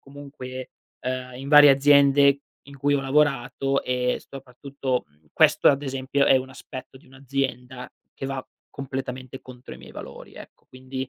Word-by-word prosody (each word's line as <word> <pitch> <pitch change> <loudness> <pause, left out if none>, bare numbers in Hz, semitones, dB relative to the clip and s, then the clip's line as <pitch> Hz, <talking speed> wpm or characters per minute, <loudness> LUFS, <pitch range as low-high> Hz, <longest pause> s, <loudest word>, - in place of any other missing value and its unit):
comunque, 135 -2 -10 0.3
uhm, 130 0 -4
in 135 +2 -8
varie 150 -1 +9
aziende 140 0 +5 0.2
in 140 0 -13
cui 145 +2 +1
ho 140 - +1
lavorato, 135 -1 0
e 125 0 -1
soprattutto 135 0 -5
mhmm, 75 +1 -33
questo - - +4
ad 140 0 +2
esempio 135 0 -1
è 135 - +6
un 130 0 -3
aspetto 130 0 -10
di 130 - -19
un'azienda 130 -1 -4 0.3
che 135 - -6
va 135 -1 -5 0.3
completamente 130 -1 -6
contro 125 0 -12
i - - -13
miei - - -14
valori - - -11
ecco, - - -14
quindi 130 0 -7
135 Hz, 155 wpm, -24 LUFS, 130-140 Hz, 0.3 s, varie